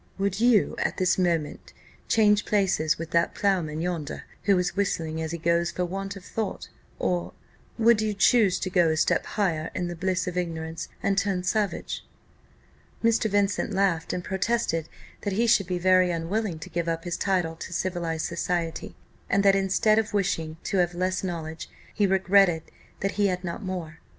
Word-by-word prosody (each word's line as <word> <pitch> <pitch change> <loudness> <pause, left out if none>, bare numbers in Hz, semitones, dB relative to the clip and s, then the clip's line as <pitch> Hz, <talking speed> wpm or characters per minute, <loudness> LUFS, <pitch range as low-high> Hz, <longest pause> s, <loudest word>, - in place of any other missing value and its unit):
Would 200 0 -1
you, 235 -3 +4
at - - -1
this 185 0 +2
instant, 170 -4 -1 0.3
change 210 -2 +4
places 180 -6 +1
with 165 0 -6
that 170 0 +2
ploughman 170 -6 0
yonder, 170 -4 -3 0.2
who 200 -2 +4
is 180 -1 -1
whistling 160 -5 -1
as 160 0 -3
he 170 - -3
goes 170 +1 +1
for 180 - -2
want 195 +2 -4
of 190 -2 -11
thought? 220 -3 -4 0.3
or, 175 -1 -1 0.4
would 230 -1 +4
you 215 -1 -1
choose 205 -2 +4
to 185 - -2
go 175 -3 +4
a 160 - 0
step - - +2
higher 165 -6 0
in 175 -1 -2
the 175 - -5
bliss 185 +1 -1
of 180 0 -4
ignorance, 165 -2 -3 0.2
and 195 0 +2
turn 190 -3 -1
savage?" 205 +2 -1 1.0
Mr. 230 -1 +3
Vincent 205 0 +1
laughed, 185 -4 +1
and 180 - -3
protested 190 -5 -1 0.3
that 205 - -2
he 230 +5 +2
should 220 -5 +3
be 180 -1 -1
very 185 0 +4
unwilling 175 +3 -2
to 155 - -9
give 170 +1 -2
up 165 0 -1
his 175 -1 -3
title 180 -4 0
to 175 - -8
civilized 170 -3 -2
society; 170 - -3 0.3
and 200 +1 +3
that, 195 0 +6
instead 195 +3 +3
of 215 -1 -2
wishing 165 -5 -1
to 195 - -1
have 175 -1 +1
less 185 +2 -1
knowledge, 160 -3 -5 0.2
he 205 -2 +2
regretted 190 -3 +4 0.4
that 195 - 0
he 200 - +5
had 180 -1 -2
not 175 +4 -4
more. 175 -5 -5
185 Hz, 180 wpm, -26 LUFS, 170-200 Hz, 1.0 s, that